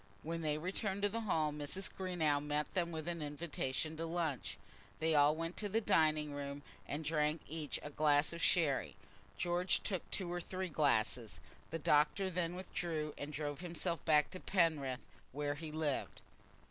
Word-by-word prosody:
When 165 +1 -3
they 150 -1 0
returned 190 +4 -2
to 205 - +4
the 230 +3 -2
hall 160 -8 +1
Mrs. 150 +6 -2
Greenow 160 -6 +1
met 150 0 -1
them 175 -3 +1
with 160 -1 -4
an 170 -2 -2
invitation 150 0 -2
to 165 +1 -2
lunch. 145 - -2 0.4
They 160 0 +2
all 145 0 +6
went 165 +2 -3
to 205 - -1
the 220 +3 +2
dining 155 -7 +3
room, 140 0 -5 0.2
and 155 +2 -3
drank 150 0 +1
each 155 -1 -3
a 150 - -6
glass 150 +1 +3
of 170 - -5
sherry. 150 - +2 0.4
George 175 +1 +2
took 190 -4 -2
two 175 -3 -1
or 175 - -2
three 185 +2 -4
glasses. 120 -7 +1 0.3
The 165 - -2
doctor 155 +6 +3
then 175 -1 -1
withdrew, 170 -5 -3
and 145 +1 -5
drove 145 -1 -3
himself 170 0 -1
back 150 -2 +4
to 185 - -6
Penrith, 155 -10 +1 0.3
where 145 +1 -1
he 155 +1 -6
lived. 155 -3 -1
155 Hz, 170 wpm, -36 LUFS, 145-175 Hz, 0.4 s, all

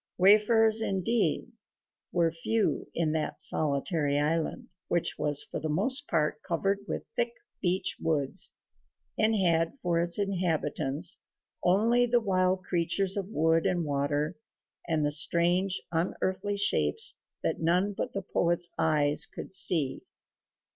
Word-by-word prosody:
Wayfarers 215 +3 +5
indeed 200 0 -1 0.6
were 170 -2 +1
few 210 +7 -2
in 165 -2 0
that 155 -1 -3
solitary 145 0 +1
island, 155 +2 -1 0.2
which 175 - 0
was 145 -1 +2
for - - -6
the 155 - -4
most 260 - -1
part 150 -2 -1
covered 195 +4 -1
with - - -5
thick 235 0 -1 0.3
beech 185 +1 -1
woods, 150 +2 0 0.6
and 220 0 +1
had 170 +1 +1
for 170 -2 +1
its 170 0 +2
inhabitants 165 -5 -1 0.4
only 230 +7 +3
the 240 0 +2
wild 185 -3 0
creatures 180 +2 +1
of 195 -2 -3
wood 165 -4 +1
and 175 -2 -1
water 145 +3 -1 0.5
and 155 -3 0
the 145 - 0
strange 175 +5 +3
unearthly 190 +4 -2
shapes 75 - +2 0.2
that - - -2
none 180 +5 +1
but - - -4
the 195 - -4
poet's 175 -1 0
eyes 150 -2 +2
could - - -9
see. 165 -7 +3
175 Hz, 130 wpm, -28 LUFS, 155-195 Hz, 0.6 s, Wayfarers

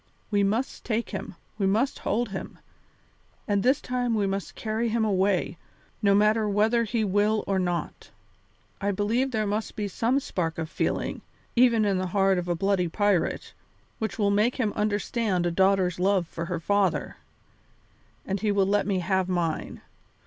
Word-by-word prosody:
We 205 -1 +3
must 220 +7 -1
take 230 0 -2
him, 195 -2 -6 0.2
we 195 - +2
must 225 +8 +1
hold 235 +1 -1
him, 190 -1 -7 0.9
and 205 -1 +1
this 260 +5 +3
time 245 -2 -1
we 205 -2 +1
must 195 0 -3
carry 225 +1 -1
him 225 0 +1
away, 190 -4 +1 0.4
no 200 -1 +4
matter 210 +1 +3
whether 220 +3 +2
he 225 0 -1
will 210 +2 +1
or 195 -1 0
not. 175 -2 -3 0.7
I 200 - 0
believe 215 +7 0
there 220 -4 -1
must 210 +2 -2
be 210 -1 -2
some 230 +7 +1
spark 165 - -3
of 160 0 -4
feeling, - - -2 0.3
even 235 -3 +4
in 195 -2 +1
the 185 - -1
heart 195 -1 +3
of 180 - -5
a 175 - 0
bloody 195 0 +1
pirate, 205 +1 0 0.5
which 220 -3 -3
will 205 -2 +2
make 210 +4 +2
him 220 -6 -1
understand 210 -2 0
a 175 - +1
daughter's 190 -1 +2
love 190 -1 +2
for 165 0 -6
her 170 -1 -3
father, 200 +3 0 1.1
and 195 +1 -2
he 215 0 +1
will 200 -1 +3
let 205 +1 +1
me 190 -3 0
have 190 0 0
mine. 170 -3 -2
205 Hz, 170 wpm, -26 LUFS, 190-220 Hz, 1.1 s, no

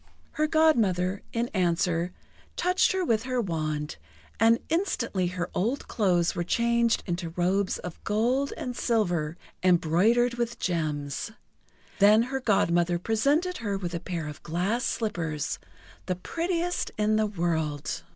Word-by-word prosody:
Her 305 0 0
Godmother, 210 - +2
in 235 +1 -1
answer, 175 -1 +1 0.4
touched 365 +1 +2
her 375 -1 0
with 225 -7 +2
her 255 -1 -1
wand, 155 - -2 0.4
and 225 +1 +5
instantly 240 - 0
her 180 0 -4
old 235 +9 -1
clothes 180 -5 +2
were 175 - -2
changed 235 +4 +2
into 175 -2 -3
robes 185 +2 +1
of 180 -2 -8
gold 245 +7 +1
and 250 -1 -4
silver 175 -10 0 0.2
embroidered 185 +8 +3
with 235 0 -1
gems. 150 -3 -2 0.7
Then 210 +2 +6
her 265 - 0
Godmother 175 -7 +2
presented 280 - +1
her 205 -4 -2
with 180 -3 -4
a 170 - -2
pair 170 -2 -4
of 150 - -8
glass 190 +10 -1
slippers, 165 -9 -2 0.5
the 185 - 0
prettiest 340 - -2
in 215 0 +2
the 215 0 +2
world. 160 -6 -2
195 Hz, 135 wpm, -27 LUFS, 175-235 Hz, 0.7 s, Then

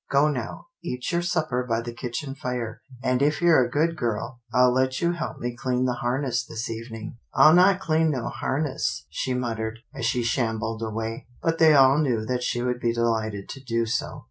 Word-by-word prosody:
Go 140 +2 +4
now, 125 -6 -4 0.2
eat 125 +3 -3
your 170 0 +1
supper 155 -8 0
by 115 -2 -1
the 120 0 -6
kitchen 125 +3 -4
fire, 125 -4 -4 0.2
and 125 +1 +1
if 145 0 +2
you're 170 -6 +5
a - - -2
good 165 +3 +1
girl, 120 -2 -3
I'll 125 0 +5
let 130 0 +1
you 170 0 +2
help 170 -2 -4
me 120 0 -4
clean 125 +1 0
the 125 -1 -1
harness 120 0 0
this 115 0 -5
evening." 115 0 -7
" - - -44
I'll 155 - +8
not 185 +1 +6
clean 160 -2 +2
no 130 -6 -2
harness," 135 - -2
she 125 +11 -2
muttered, 115 -2 -2 0.2
as 130 -4 -2
she 120 0 +1
shambled 115 -2 -1
away; 115 0 -4 0.2
but 165 0 +1
they 160 -2 +7
all 135 +1 +6
knew 120 -7 +1
that 125 +1 -1
she 120 -1 -1
would 125 0 -1
be 120 -1 +1
delighted 110 -3 -1
to 135 - -8
do 115 -2 0
so. 115 - -2
125 Hz, 205 wpm, -25 LUFS, 115-140 Hz, 0.2 s, I'll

